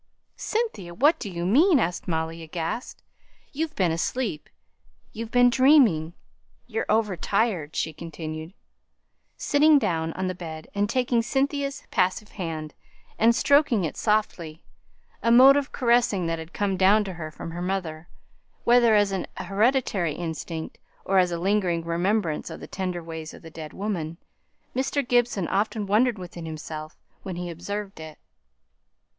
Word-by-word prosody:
"Cynthia! 425 - -3
what 290 - +4
do 205 - -5
you 170 -1 -4
mean?" 295 - +5
asked 175 -3 -2
Molly, 165 -1 -2
aghast. 165 +7 -5 0.5
"You've 310 +2 -3
been 180 -4 +2
asleep 165 +1 -2 0.6
you've 225 +1 -6
been 245 +1 +5
dreaming. 240 - +4 0.5
You're 225 -2 -3
over 215 -3 +2
tired," 185 -4 -1 0.2
continued 160 -1 -7
she, 190 - -27 0.8
sitting 300 0 +4
down 165 -9 0
on 185 - -3
the 185 - -1
bed, 160 -3 -8
and 205 0 0
taking 245 -1 +1
Cynthia's 275 +3 -1
passive 185 +3 0
hand, 160 -5 -5 0.5
and 230 +1 +5
stroking 280 -8 +3
it 160 - -3
softly 180 -7 -1 0.6
a 230 - +2
mode 260 +3 +8
of 285 -1 -1
caressing 235 -7 +2
that 165 0 -1
had 160 +1 -9
come 200 -2 -1
down 200 +3 +5
to 195 -2 -6
her 160 -2 -6
from 165 +1 -8
her 175 +1 -6
mother 175 -3 -3 0.6
whether 235 -2 +5
as 205 -1 +3
an 190 -2 -2
hereditary 195 - +1
instinct, 160 -1 -5 0.3
or 195 0 +3
as 180 -1 +2
a 170 - -1
lingering 180 -2 0
remembrance 170 -1 0
of - - -8
the - - -8
tender 180 -2 -4
ways 160 -1 -7
of - - -15
the 165 - -11
dead 155 -1 -8
woman, 170 -6 -4 0.6
Mr. 270 +1 -1
Gibson 240 -8 +2
often 210 +1 0
wondered 220 +4 +2
within 175 -2 -8
himself 155 0 -7 0.2
when 190 -3 -6
he 175 0 -4
observed 195 +3 -6
it. 155 -1 -9
190 Hz, 150 wpm, -25 LUFS, 165-235 Hz, 0.8 s, mode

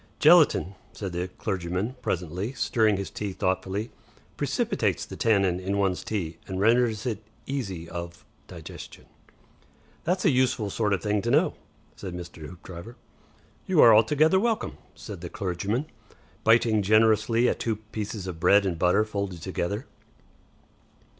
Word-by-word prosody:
"Gelatine," 95 - +5 0.2
said 95 -4 -5
the 90 +1 -2
clergyman, 95 +4 -3
presently, 90 - -3
stirring 110 -6 +2
his 100 - -5
tea 100 -2 -4
thoughtfully, 95 +4 -2 0.4
"precipitates - - -1
the - - -9
tannin 100 -5 +2
in 95 +2 -2
one's 95 -2 0
tea 85 -7 -4
and 95 -1 -4
renders 115 +1 +2
it 110 -4 -2 0.2
easy 95 -12 -4
of 85 0 -7 0.2
digestion." - - -10 1.0
"That's 180 +3 0
a - - +6
useful 130 -5 +1
sort 105 -1 0
of 95 - -1
thing 105 -1 +1
to 120 - -2
know," - - +3 0.4
said 95 -3 -7
Mr. 85 -3 -8
Hoopdriver. 90 +5 -10 0.7
"You 185 -4 +2
are 115 - +9
altogether 150 - +4
welcome," 225 +2 -1 0.2
said 100 -6 -9
the 85 - -6
clergyman, 100 - -2 0.6
biting 115 -1 +4
generously 110 +3 +3
at - - 0
two 115 -2 -1
pieces 105 -2 -6
of 90 -3 -6
bread 100 +4 +5
and 85 -4 -2
butter 90 +5 +3
folded 100 -5 -4
together. 95 +5 -3
100 Hz, 140 wpm, -26 LUFS, 90-115 Hz, 1.0 s, are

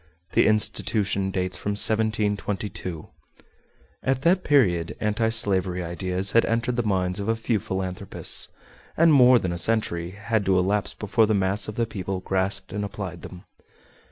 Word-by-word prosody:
The - - +3
institution 105 -2 0
dates 95 -1 -2
from 105 - -2
1722. 105 -5 0 0.9
At 130 0 -1
that 180 +2 +3
period 90 - +2
anti 110 +1 0
slavery 95 -5 +2
ideas 90 +2 -1
had 115 - +4
entered 120 +2 -1
the - - +2
minds 95 -3 -1
of 100 - -4
a 115 - +2
few 115 -1 -1
philanthropists, 95 0 -2 0.5
and 165 -1 +5
more 125 -2 +7
than 90 -6 -2
a 85 - -4
century 85 -5 -1
had 110 0 -1
to 95 -1 +3
elapse 100 +3 0
before 110 +2 +1
the 110 - +1
mass 100 +1 +1
of 110 - -6
the 115 - 0
people 95 -3 -5
grasped 95 +1 -1
and 105 0 -3
applied 95 -4 -6
them. 90 -1 -11
100 Hz, 155 wpm, -24 LUFS, 95-110 Hz, 0.9 s, more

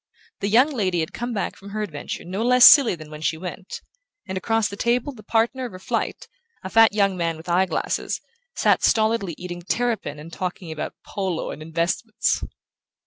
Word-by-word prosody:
The 200 - -1
young 250 +8 +5
lady 185 - 0
had 160 - -4
come 240 +1 -4
back 210 -4 -2
from 200 - -12
her 215 +1 -3
adventure 155 -6 -6
no 190 +4 -4
less 250 +1 +7
silly 275 - +8
than 155 -2 -12
when 150 0 -9
she 160 0 0
went; 180 +2 -7 0.5
and 190 - -4
across 225 +3 +1
the 200 - -7
table 240 +6 0
the 225 - -13
partner 230 +5 0
of 235 - -7
her - - -7
flight, 185 - -3 0.4
a 190 - -6
fat 225 -2 +6
young 200 -2 +2
man 165 -2 -1
with 160 - -13
eye 180 +2 +2
glasses, - - -2 0.4
sat - - +2
stolidly 220 -6 +2
eating 175 -1 -7
terrapin 220 -4 -1
and 160 +3 -11
talking 180 -2 -5
about 155 - -5
polo 190 -5 -3
and - - -9
investments. 170 +8 -1
195 Hz, 195 wpm, -23 LUFS, 175-225 Hz, 0.5 s, silly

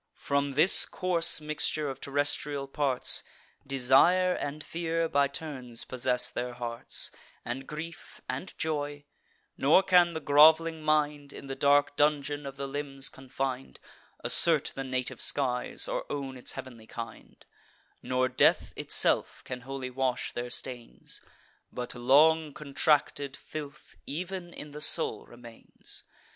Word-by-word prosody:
From 140 0 -1
this 155 +7 +6
coarse 175 -3 +2
mixture 155 0 -2
of 135 -1 -6
terrestrial 145 0 -2
parts, 135 -2 +3 0.5
Desire 135 +8 +4
and 145 -1 -5
fear 165 0 -2
by 140 -2 +2
turns 130 -5 -6
possess 125 0 +1
their 125 0 -4
hearts, 120 -1 -2 0.3
And 130 +3 -5
grief, 160 +2 -9
and 135 +9 -5
joy; 145 -2 -3 0.5
nor 155 +7 +5
can 180 -3 +4
the 160 - -3
groveling 160 +2 +5
mind, 150 -2 0
In - - -9
the 135 0 -6
dark 145 +1 +3
dungeon 145 -1 0
of 135 0 -9
the 140 0 -4
limbs 135 -1 -3
confin'd, 130 0 -5 0.4
Assert 160 -4 +7
the 135 - -5
native 130 -1 -4
skies, 125 -3 +2
or - - -4
own 135 -2 -4
its 125 - -4
heav'nly 115 -4 -10
kind: 115 -1 -10 0.6
Nor 130 +1 0
death - - +2
itself - - +1
can 125 -1 -6
wholly 130 0 -6
wash 130 -1 -2
their 120 0 -5
stains; 120 -1 -7 0.5
But 125 0 -5
long 150 +5 +3
contracted 145 -1 0
filth 150 -1 -9
ev'n 175 +3 -5
in 150 -3 -9
the 150 +1 -9
soul 160 +2 +1
remains. 120 -1 -11
140 Hz, 130 wpm, -28 LUFS, 130-155 Hz, 0.6 s, Assert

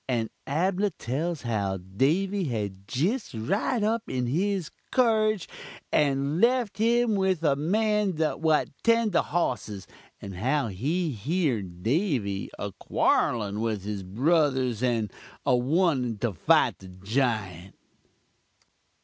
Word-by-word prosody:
And 115 -3 0 0.2
Abnah 185 +6 +1
tells 150 +6 -3
how 100 -5 -1
Davy 160 - 0
had 100 -6 -4
jist 175 - -1
rid 200 - 0
up 225 +2 +1
in 125 -1 -1
his 180 +5 -1 0.2
carruge 215 -6 +2 0.4
and 140 +3 +1
left 240 -3 +2
um 235 0 +3
with 190 -4 +1
the 150 -4 +3
man 210 +6 +1 0.3
what 160 -2 +2
tend 230 -2 +3
the 170 - +3
hossis 120 - -2 0.3
and 95 -2 -8
how 130 +4 0
he 150 - -1
heern 110 - -2
Davy 120 - 0
a 100 - -4
quorl'n 105 +2 0
with 110 -3 -2
his 105 -1 -4
bruthers 130 - +1
and 115 -5 0 0.3
a - - +3
wantun 130 - +1
to 120 -4 0
fite 80 - +3
the 95 - -12
jiunt. 95 -2 -2
135 Hz, 125 wpm, -27 LUFS, -, 0.4 s, um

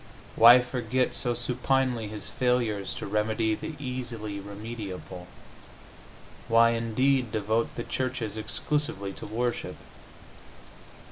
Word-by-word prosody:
Why 120 +2 +9
forget 125 0 -1
so 120 -2 0
supinely 125 -1 0
His 105 -1 -6
failures 120 -6 0
to - - -5
remedy 110 +2 0
the 155 +7 -5
easily 120 -6 -5
remediable? 100 -3 -7 1.2
Why, 115 +1 +5
indeed, 115 +2 +1
devote 110 +2 0
the 120 - -3
churches 125 -5 -3
exclusively 115 0 -2
to - - -8
worship? 120 +3 -2
115 Hz, 105 wpm, -27 LUFS, 105-125 Hz, 1.2 s, Why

